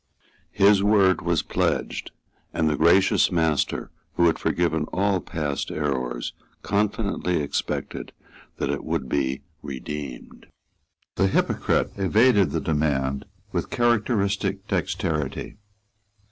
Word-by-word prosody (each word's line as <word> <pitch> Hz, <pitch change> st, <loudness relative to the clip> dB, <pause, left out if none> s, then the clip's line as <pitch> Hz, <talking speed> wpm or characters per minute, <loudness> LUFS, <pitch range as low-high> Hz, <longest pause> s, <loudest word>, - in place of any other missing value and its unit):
His 100 Hz, 0 st, +5 dB
word 100 Hz, -2 st, +4 dB
was -, -, +1 dB
pledged; -, -, -1 dB, 0.5 s
and 80 Hz, -, +2 dB
the 75 Hz, -, +2 dB
gracious 95 Hz, +7 st, +4 dB
master 80 Hz, -4 st, 0 dB, 0.2 s
who 85 Hz, -, +3 dB
had 80 Hz, -, +3 dB
forgiven 80 Hz, -3 st, 0 dB
all 95 Hz, +2 st, +1 dB
past 75 Hz, -5 st, -3 dB
errors 65 Hz, -5 st, -2 dB, 0.3 s
confidently 100 Hz, -3 st, 0 dB
expected 70 Hz, -, -3 dB, 0.5 s
that -, -, -1 dB
it 70 Hz, -, -3 dB
would 65 Hz, -, -2 dB
be 65 Hz, 0 st, -1 dB, 0.2 s
redeemed. 70 Hz, -1 st, -7 dB, 0.7 s
The 95 Hz, -, +4 dB
hypocrite -, -, +1 dB
evaded 100 Hz, -, +4 dB
the -, -, -1 dB
demand 70 Hz, -3 st, 0 dB, 0.3 s
with -, -, -2 dB
characteristic 105 Hz, -4 st, +1 dB
dexterity. 80 Hz, -6 st, -2 dB
85 Hz, 105 wpm, -24 LUFS, 70-100 Hz, 0.7 s, His